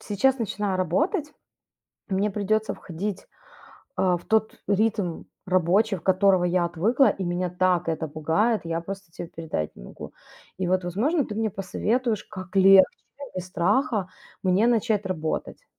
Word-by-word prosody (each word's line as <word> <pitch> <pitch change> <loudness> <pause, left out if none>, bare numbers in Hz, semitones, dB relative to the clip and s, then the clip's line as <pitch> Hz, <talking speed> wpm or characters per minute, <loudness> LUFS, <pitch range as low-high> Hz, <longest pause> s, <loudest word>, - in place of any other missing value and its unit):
сейчас 260 +6 +1
начинаю 205 -3 -2
работать. 300 - 0 0.8
Мне 200 +2 0
придется 215 +2 0
входить, 185 +3 -5 0.7
а, 180 -2 +2
в - - -16
тот 220 0 +1
ритм 205 -4 0 0.2
рабочий, 185 +4 +2
от 160 - -14
которого 190 -1 +3
я 175 0 +2
отвыкла, 215 - +2
и 195 - -3
меня 175 +1 -1
так 180 -1 +1
это 160 0 -2
пугает. 165 +9 +1
Я 165 0 -2
просто 195 0 -8
те 170 - -7
передать 160 - -4
не - - -12
могу. - - -10 0.4
И 185 -1 -2
вот, 185 0 +1
возможно, 245 - 0
ты 210 - -6
мне 220 -1 0
посоветуешь, 215 +4 -1
как 185 0 -10
легче, 195 0 +8 0.3
да, 285 - -7
без 185 -1 -4
страха 200 - +1 0.3
мне 190 +5 +3
начать 220 -3 +1
работать. 160 -4 -4
190 Hz, 150 wpm, -25 LUFS, 175-215 Hz, 0.8 s, легче